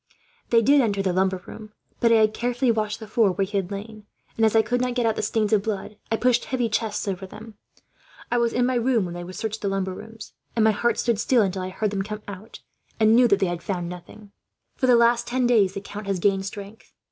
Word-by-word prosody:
They 230 -1 +4
did 280 +4 +5
enter 200 -5 0
the 185 -2 0
lumber 190 0 0
room. 215 -1 -11 0.3
But 230 - +3
I - - +6
had 215 -1 +4
carefully 245 +2 0
washed 215 -1 -2
the 220 - -8
floor 215 -3 +2
where 195 +1 0
he 205 +2 -8
had 190 -2 -2
lain 210 +1 -8 0.3
and, 225 - 0
as 220 0 +3
I 220 - +5
could 245 +2 -1
not 250 -1 -1
get 245 -2 +1
out 225 -1 +1
the - - -2
stains 220 -1 0
of 210 - +4
blood, 210 0 -4 0.2
I - - +3
pushed 245 0 +2
some - - -11
heavy 250 -3 0
chests 215 -1 -2
over 190 -1 -4
them. 215 +3 -11 0.8
"'I 240 - +2
was 235 -1 +1
in 245 0 +1
my 255 - +1
room 240 -3 +1
when 175 - -6
they 175 +1 -7
searched 220 +3 -5
the 200 - -2
lumber 195 -1 -1
room, 225 +4 -11 0.4
and 225 - +2
my 220 - +5
heart 235 +3 0
stood 235 -4 0
still 240 0 +3
until 190 -1 -2
I 185 - -4
heard 210 +2 -2
them 200 -1 -2
come 210 +1 -6
out, 200 +2 -10 0.4
and 220 0 +5
knew 245 0 +6
that 200 -3 +3
they 195 - +1
had 175 -1 -3
found 175 -3 -3
nothing. 180 +4 -11 0.4
"'For 260 - 0
the 250 - +6
last 235 0 +3
ten 250 +1 0
days, 210 -6 +3
the 200 - -4
count 205 +1 -8
has 195 -1 0
gained 195 +1 +1
strength. 200 +2 -10
215 Hz, 260 wpm, -24 LUFS, 195-235 Hz, 0.8 s, I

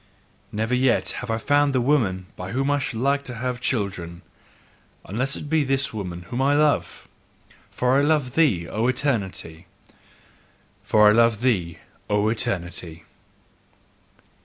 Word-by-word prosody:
Never 110 +3 -2
yet 125 -1 +2
have 125 - -7
I 110 - 0
found 145 +3 +2
the - - +3
woman 115 -9 +1
by 90 +4 -7
whom 135 +3 0
I 145 - +2
should 125 -4 -4
like 140 +1 +2
to 125 - -6
have 125 +1 -3
children, 95 -9 -3 0.8
unless 130 - -1
it 150 - -7
be 155 0 +2
this 135 -1 0
woman 90 -5 -5
whom 120 +8 -4
I 140 +2 +3
love: 150 0 0 0.6
for 125 +2 +1
I - - +3
love 145 -4 +1
thee, 125 - +2
O 110 +3 -1
Eternity! 100 - -2 1.1
FOR 105 -1 +5
I - - +6
LOVE 115 0 +3
THEE, 90 -10 0 0.3
O 105 +1 +2
ETERNITY! 85 -6 -3
120 Hz, 145 wpm, -23 LUFS, 100-135 Hz, 1.1 s, I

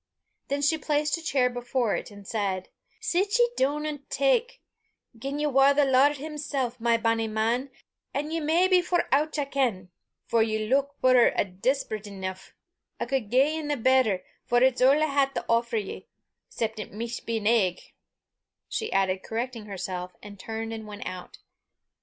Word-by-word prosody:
Then 285 +1 -1
she 315 +2 +2
placed 300 0 +1
a - - -10
chair 275 -5 +2
before 245 -2 -1
it, - - -5
and 205 -2 -13
said 195 -4 -2 0.3
"Sit 410 0 +1
ye 480 0 +4
doon, 290 +3 0
an' 295 -2 -4
tak. - - +1 0.6
Gien 275 +4 -4
ye 300 - 0
war 275 0 +4
the 290 0 +4
Lord 275 +2 +4
himsel', 285 -4 -3
my 230 0 +3
bonnie 225 0 +1
man, 225 +5 0 0.4
an' 295 +3 -3
ye 330 - -1
may 325 +4 +3
be 370 -1 +5
for 355 0 0
oucht 305 +3 +2
I 290 - 0
ken, 240 -10 -1 0.3
for 230 - +2
ye 220 -1 0
luik 275 +3 +3
puir 255 -2 +6
an' 185 -2 -2
despised 230 -6 -1
eneuch, 190 -2 -7 0.4
I - - -1
cud 245 -4 -2
gie 280 +6 +3
nae 295 -1 -1
better, 250 -6 +3 0.2
for 240 +1 +2
it's 260 -1 +3
a' 255 - +7
I 300 +3 +4
hae 280 -2 +1
to - - -3
offer 235 0 +1
ye 205 -3 -5 0.4
'cep 220 -1 -3
it 210 - -6
micht 230 +3 -6
be 230 -1 0
an 210 - -5
egg," 210 -6 +3 0.9
she 445 - -3
added, 190 -1 +1
correcting 230 0 -4
herself, 180 -2 -5
and 205 -1 -11
turned 225 +2 -5
and 220 -1 -7
went 205 -1 -8
out. 185 -1 -7
250 Hz, 180 wpm, -27 LUFS, 220-290 Hz, 0.9 s, a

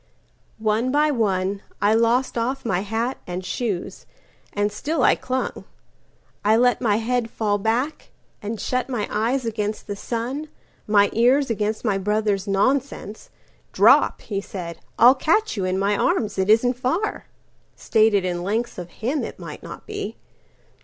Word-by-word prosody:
One 220 +3 0
by 300 +2 +3
one 195 -5 0 0.2
I 205 +1 +3
lost 235 +3 +2
off 250 +3 -2
my 180 -6 +1
hat 225 +6 -2
and 180 +1 -5
shoes, 195 -1 -4 0.4
And 205 0 0
still 280 +6 -1
I - - +6
clung. 260 0 -3 0.8
I 215 +2 +4
let 245 +1 +3
my 215 -4 +2
head 230 +1 0
fall 205 -2 -1
back, 235 +9 -1 0.3
And 210 +1 -4
shut 255 0 -1
my 230 -5 -2
eyes 235 +4 0
against 215 -1 -3
the 205 - -4
sun, 250 +8 -4 0.4
my 205 -1 +4
earsAgainst 230 -3 +2
my 200 -3 +1
brother's 210 0 0
nonsense; 220 +2 -1 0.4
"Drop," - - +5
he 200 -2 -3
said,"I'll 195 +6 +2
catch 330 +11 +1
you 195 -3 -1
in 185 0 0
my 200 +2 +1
arms. 210 - 0
It 190 +1 +1
isn't 245 +3 +4
far."(Stated 225 - -1
in 175 -1 -2
lengths 220 +4 -2
of 175 -1 -7
him 255 - -2
it - - -6
might - - -9
not - - -10
be.) - - -5
220 Hz, 145 wpm, -23 LUFS, 205-250 Hz, 0.8 s, I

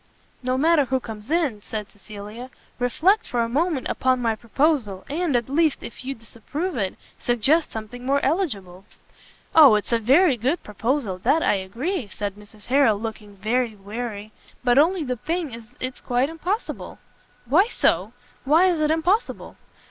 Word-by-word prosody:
"No 255 0 0
matter 310 0 +4
who 260 0 0
comes 220 -1 -9
in," 300 -10 0
said 210 0 -6
Cecilia, 210 +4 -10 0.3
"reflect 355 - +2
for 240 - 0
a - - -1
moment 295 +3 0
upon 255 -1 +1
my 230 -2 +1
proposal, 235 -4 0
and, 315 -1 -1
at 235 -1 +1
least, 305 +2 +1
if 235 - -9
you 270 +1 -4
disapprove 280 - -5
it, 195 -5 -2 0.2
suggest 265 +7 +2
something 225 +3 -7
more 275 +2 +2
eligible." 200 - -2 0.7
"Oh, 290 -8 +8
it's 210 - -2
a 235 - +3
very 270 - +4
good 265 +10 -1
proposal, 220 -2 -2
that 320 - +2
I - - +3
agree," 230 - -3
said 200 0 -4
Mrs 210 +1 -16
Harrel, 255 -5 +4
looking 215 -2 -7
very 225 +3 0
weary, 210 +1 -6 0.3
"but 245 +2 +4
only 340 +3 +3
the 250 -3 -3
thing 325 0 -3
is 230 -1 -9
it's 255 0 -4
quite 250 +3 +1
impossible." 360 +7 -4 0.5
"Why 325 - +4
so? 215 - +1 0.3
why 315 +7 +5
is 330 -3 -1
it 305 - +2
impossible?" 350 +8 0
250 Hz, 165 wpm, -23 LUFS, 215-310 Hz, 0.7 s, Oh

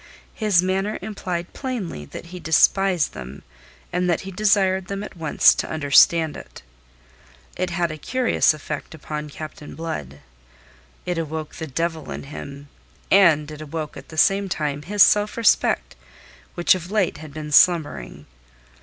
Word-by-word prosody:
His 205 -5 +2
manner 195 +3 -1
implied 185 -4 -5
plainly 230 - -5
that 70 - -9
he 180 - -6
despised 175 +2 +2
them 65 +2 -9 0.5
and 180 0 0
that 175 - +1
he 195 - -8
desired 190 -2 +2
them 195 +1 -4
at 210 - -9
once 160 -3 +4
to - - -4
understand 155 +1 +4
it. - - -12 0.9
It 185 0 -2
had 175 -2 -1
a 155 - -8
curious 255 - +2
effect 150 0 -6
upon 150 0 -6
Captain 155 0 -9
Blood. 75 - -6 0.8
It 180 -2 -2
awoke 155 -1 -5
the 160 - -5
devil 160 +1 -3
in - - -6
him, 140 0 -9 0.4
and 160 -6 +5
it 150 0 -9
awoke 155 0 -5
at - - -11
the 160 - -10
same 195 +4 +3
time 150 -4 -2
his 205 +5 +4
self 210 +1 +3
respect 60 - +2 0.6
which 175 - +4
of 180 -1 -5
late 205 -3 0
had 155 -1 -10
been 150 0 -7
slumbering. 145 - +3
165 Hz, 155 wpm, -22 LUFS, 150-190 Hz, 0.9 s, and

